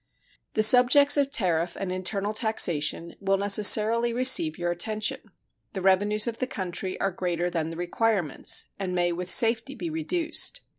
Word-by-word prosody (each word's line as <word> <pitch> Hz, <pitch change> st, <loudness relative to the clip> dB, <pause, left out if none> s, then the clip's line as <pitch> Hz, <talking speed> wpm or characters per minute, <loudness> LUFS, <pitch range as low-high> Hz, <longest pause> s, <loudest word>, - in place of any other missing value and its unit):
The 215 Hz, -, +2 dB
subjects 255 Hz, +5 st, +5 dB
of 285 Hz, -2 st, 0 dB
tariff 175 Hz, -, -1 dB
and 195 Hz, -2 st, -5 dB
internal 195 Hz, +3 st, -4 dB
taxation 170 Hz, -7 st, 0 dB
will 195 Hz, 0 st, -1 dB
necessarily 215 Hz, +4 st, +3 dB
receive 260 Hz, +7 st, +3 dB
your 175 Hz, -1 st, -3 dB
attention. 215 Hz, +5 st, -2 dB, 0.5 s
The 190 Hz, -3 st, -6 dB
revenues 205 Hz, +3 st, +2 dB
of 230 Hz, -1 st, -6 dB
the 255 Hz, -, -3 dB
country 185 Hz, -4 st, -6 dB
are 195 Hz, -, -2 dB
greater 175 Hz, -1 st, -4 dB
than 160 Hz, -2 st, -3 dB
the 165 Hz, -, -9 dB
requirements, 175 Hz, -2 st, -1 dB
and 185 Hz, -2 st, -4 dB
may 175 Hz, -1 st, -1 dB
with 180 Hz, +1 st, -6 dB
safety 230 Hz, +5 st, +2 dB
be 335 Hz, +2 st, -6 dB
reduced. 330 Hz, +9 st, 0 dB
200 Hz, 155 wpm, -24 LUFS, 180-235 Hz, 0.5 s, subjects